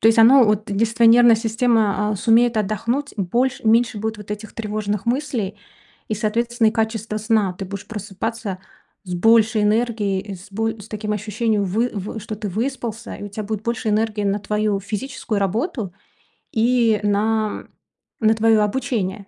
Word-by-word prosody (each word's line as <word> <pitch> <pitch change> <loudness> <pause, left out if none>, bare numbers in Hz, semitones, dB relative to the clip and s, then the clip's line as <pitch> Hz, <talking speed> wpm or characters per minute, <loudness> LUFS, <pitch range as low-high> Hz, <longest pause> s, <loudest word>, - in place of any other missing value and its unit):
То 225 - +5
есть 225 0 +3
оно 240 0 +7
от 210 0 0
если 220 +3 0
твоя 230 0 +6
нервная 240 -1 +7
система, 220 -2 +1
а, 210 - -1
сумеет 230 +3 +3
отдохнуть 230 +7 -1
больше 235 +6 -1
меньше 225 -1 +3
будет 220 +1 -3
вот 210 0 -12
этих 210 +1 -6
тревожных 210 -2 -3
мыслей 235 -6 -2 0.5
и, 215 - -1
соответственно, 230 +2 +1
и - - -2
качество 220 -1 -2
сна. 215 -3 +1
Ты 190 +1 -7
будешь 200 +1 -7
просыпаться 210 0 -5 0.5
с 180 - -5
большей 220 +3 +4
энергией 210 -2 +1
и 200 0 -7
с 185 +3 -13
боль 225 +1 -2
с 205 - -11
таким 210 -1 -4
ощущением, 210 0 -1
вы 220 +6 0
вы 205 +2 -5
что 215 +1 -6
ты 210 -1 -5
выспался, 230 +1 -4
и - - -9
у - - -6
тебя 210 +2 -6
будет 215 0 -4
больше 235 0 -2
энергии 215 -1 0
на 200 +1 +1
твою 210 -1 -1
физическую 215 +1 -4
работу 215 - -2 0.6
и 230 -1 +2
на - - +1 0.4
на, - - -5
м, - - -14 0.6
на - - +5
твое 220 0 +3
обучение. 210 -3 -2
215 Hz, 175 wpm, -21 LUFS, 205-230 Hz, 0.6 s, оно